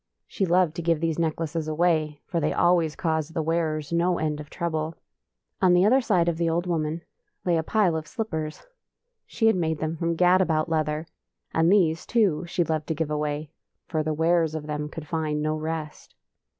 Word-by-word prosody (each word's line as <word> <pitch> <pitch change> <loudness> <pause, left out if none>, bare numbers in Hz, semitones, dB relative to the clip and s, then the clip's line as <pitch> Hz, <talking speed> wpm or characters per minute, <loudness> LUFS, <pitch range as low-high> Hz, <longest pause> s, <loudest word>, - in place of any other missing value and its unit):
She 195 - -2
loved 175 -2 +3
to - - -2
give 165 -1 +1
these 165 0 -1
necklaces 160 -1 -1
away, 155 -2 +1
for 170 - -2
they - - 0
always 170 -3 +2
caused 160 -1 -2
the 160 - 0
wearers 155 -2 -1
no 175 +1 +2
end 150 -1 -1
of 150 -1 -9
trouble. 160 -2 -3 0.7
On 180 -2 +5
the 180 +2 +5
other 260 +6 +5
side 185 -8 +2
of 170 -2 0
the 170 -1 +2
old 170 +2 0
woman 165 -1 -2 0.4
lay 175 -2 +3
a 165 - +2
pile 185 0 +2
of 155 -1 -4
slippers. 160 -10 -4 0.6
She 225 - -1
had 225 - +5
made 160 -3 0
them 155 +2 -2
from 165 +1 -1
gad 180 +2 +4
about 160 -2 +1
leather, 155 0 -1 0.5
and 165 +2 +3
these, 165 -6 +2
too, 200 -9 +2
she 175 +1 0
loved 155 -2 -2
to 160 - -1
give 155 0 -2
away, 150 0 -2 0.3
for 160 -3 -1
the 155 0 -1
wearers 160 0 +2
of 155 -1 -4
them 150 0 -3
could 155 0 -8
find 155 -2 -1
no 155 +1 0
rest. 155 -1 -5
160 Hz, 200 wpm, -25 LUFS, 155-175 Hz, 0.7 s, On